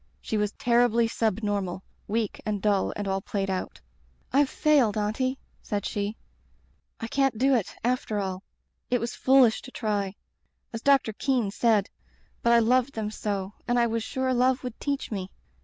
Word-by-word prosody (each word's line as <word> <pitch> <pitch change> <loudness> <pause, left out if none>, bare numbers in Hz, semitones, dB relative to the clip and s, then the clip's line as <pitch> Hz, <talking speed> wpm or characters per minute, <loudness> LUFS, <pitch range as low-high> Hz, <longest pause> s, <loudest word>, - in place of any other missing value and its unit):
She - - -4
was 210 -1 +1
terribly 235 -1 +3
sub 220 -2 -1
normal; 195 -3 -2 0.2
weak 220 0 -2
and 210 -1 -2
dull 200 -1 +1
and 205 -1 -3
all 195 0 0
played 195 -1 -2
out. 185 - -4 0.5
"^Fve 280 +1 +5
failed. 265 -8 +3
Auntie/ 240 +6 0 0.2
said 205 -2 -3
she. 205 +1 -2 0.8
*I 230 - -4
can't 270 0 +1
do 270 +4 +3
it, 230 -7 0
after 240 -3 0
all. 190 -2 -3 0.5
It 245 - +2
was 235 +1 -3
foolish 260 -4 +4
to - - -10
try, 205 -5 -2 0.6
as 225 - -4
Doc 275 0 +5
tor 220 - -5
Kean 245 -3 0
said, 215 -2 +2 0.5
but 235 - +3
I 235 - +7
loved 250 +3 +3
them 215 -1 -3
so, 200 -2 -3
and 245 0 +2
I 240 - +4
was 230 0 -1
sure 260 +3 -1
love 255 +1 +2
would 250 -3 -6
teach 280 -4 -2
me. 190 -3 -4
225 Hz, 175 wpm, -27 LUFS, 205-250 Hz, 0.8 s, I